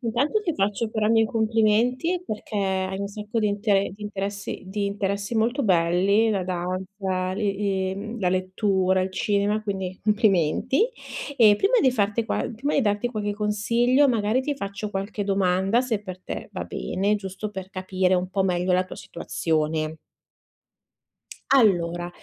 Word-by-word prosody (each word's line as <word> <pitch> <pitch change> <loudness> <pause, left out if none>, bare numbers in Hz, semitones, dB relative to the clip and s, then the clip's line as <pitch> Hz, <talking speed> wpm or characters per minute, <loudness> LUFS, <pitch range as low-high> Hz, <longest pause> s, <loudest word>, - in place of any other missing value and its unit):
Intanto 265 - 0
ti 345 - 0
faccio 205 +2 0
però 215 -1 0
i - - +3
miei 225 0 +5
complimenti 230 +9 +1
perché 215 0 -6
hai 190 -1 -1
un 200 - -2
sacco 210 +3 -4
di 215 - +2
intere 205 -1 +1
di 210 - -13
interessi 200 -1 -4
di 200 +2 -2
interessi 200 +1 -2
molto 235 +5 +1
belli. 190 +3 +3
La 200 -4 0
danza 185 +1 -3
le 205 0 -1
ehm, 195 +3 -2
la 185 - +2
lettura, 185 0 +1
il 185 +1 -1
cinema, 205 +2 0
quindi 190 -3 -4
complimenti. 210 - +2 0.5
Ehm, 215 -4 +6
prima 395 - +2
di 260 - +4
farti 215 -1 0
qual 235 - -2
prima 275 +7 -2
di 280 - +3
darti 205 +2 0
qualche 210 -3 -2
consiglio, 230 +6 +2
magari 230 0 +1
ti 290 +2 -1
faccio 205 -4 -5
qualche 200 +1 -3
domanda 195 +2 +2
se 230 -5 -2
per 185 -2 -8
te - - -7
va - - -4
bene, 200 +3 -1
giusto 200 +1 -5
per 190 -2 -7
capire 185 0 0
un 180 0 0
po' 195 +1 0
meglio 180 -1 +1
la 185 +1 +3
tua 185 - -10
situazione. 160 -2 -2 1.6
Allora, 175 -8 +3
200 Hz, 160 wpm, -24 LUFS, 190-220 Hz, 1.6 s, Ehm